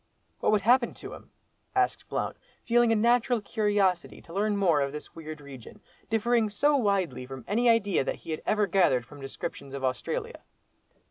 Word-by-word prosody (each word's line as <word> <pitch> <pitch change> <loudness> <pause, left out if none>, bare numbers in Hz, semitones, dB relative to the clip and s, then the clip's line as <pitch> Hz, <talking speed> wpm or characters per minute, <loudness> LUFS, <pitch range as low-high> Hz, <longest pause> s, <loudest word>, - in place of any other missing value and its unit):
"What - - +2
would 210 -1 +3
happen 240 +4 +3
to - - -9
him?" - - -12 0.5
asked 385 -1 0
Blount, - - -2 0.3
feeling 240 0 +4
a - - +4
natural 235 +2 +3
curiosity 205 -4 0
to 165 - -13
learn 205 +2 0
more 170 -7 +3
of 140 0 -1
this 150 +1 -9
weird 155 -1 -8
region, 140 - -12 0.3
differing 225 0 +2
so 290 +8 +2
widely 195 - 0
from 135 -1 -9
any 235 +4 +2
idea 205 -9 +3
that - - -2
he - - -9
had 155 - -3
ever 210 -1 +2
gathered 175 -10 +2
from 145 +3 -13
descriptions 135 0 -6
of 135 - -6
Australia. 130 -3 -3
200 Hz, 180 wpm, -28 LUFS, 145-225 Hz, 0.5 s, feeling